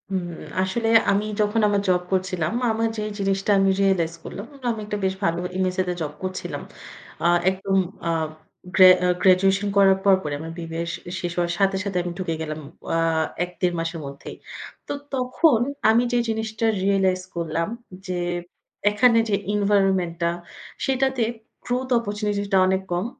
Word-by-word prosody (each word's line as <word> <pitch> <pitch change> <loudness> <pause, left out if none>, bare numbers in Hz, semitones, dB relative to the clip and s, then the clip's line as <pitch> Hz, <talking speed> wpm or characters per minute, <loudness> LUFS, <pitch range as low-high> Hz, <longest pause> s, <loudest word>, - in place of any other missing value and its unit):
হুম, 190 -2 -2 0.4
আসলে 205 +5 -1 0.2
আমি 200 +1 +1 0.2
যখন 210 +2 +1
আমার 205 -1 +1
জব 180 -1 +3
করছিলাম, 185 -4 0 0.2
আমার 225 +1 0
যে - - -2 0.2
জিনিসটা 195 +1 0
আমি 195 0 +4
রিয়ালাইজ 180 -4 +2
করলাম। 200 - -7 0.3
আমি 225 - -4
একটা 210 0 -3
বেশ 190 - +1
ভালো 170 -2 +1 0.2
MSA 185 0 +1
তে - - 0
জব 150 -2 -3
করছিলাম। 185 0 -4 0.6
আ - - 0 0.2
একদম 195 +1 -1 0.3
আ - - +1 0.7
গ্র্যা 185 -1 +9
আ - - +3
গ্র্যাজুয়েশন 195 +2 +4
করার 195 -1 +6
পরপরই 190 -7 +3
আমার 165 +1 -6
BBA 165 0 -4
শ - - -2 0.2
শেষ 175 - -3
হওয়ার 175 -1 +1
সাথে, 195 -1 +3
সাথে 200 -3 -2
আমি 175 - -4
ঢুকে 170 -3 -2
গেলাম 155 -1 -4 0.3
ও - - -11
আ - - +2 0.4
১-১.৫ 180 0 -2
মাসের 165 0 -3
মধ্যেই। 140 0 -8 0.5
তো - - -2 0.2
তখন 255 +1 +3 0.3
আমি 230 +2 +4
যেই 240 -1 +2
জিনিসটা 220 0 -2 0.2
রিয়ালাইজ 190 -2 +2
করলাম 165 0 -1 0.4
যে 185 - -2 0.8
এখানে 230 +3 +4
যে 200 - +3 0.2
এনভায়রনমেন্ট 195 -4 +2
টা, 170 - +2 0.6
সেইটাতে 265 -1 +1 0.4
গ্রোথ 250 +1 -1
অপরচুনিটি 210 -2 -2
টা - - +6
অনেক 190 0 +1
কম, 175 +3 0
195 Hz, 160 wpm, -23 LUFS, 180-210 Hz, 0.8 s, গ্র্যা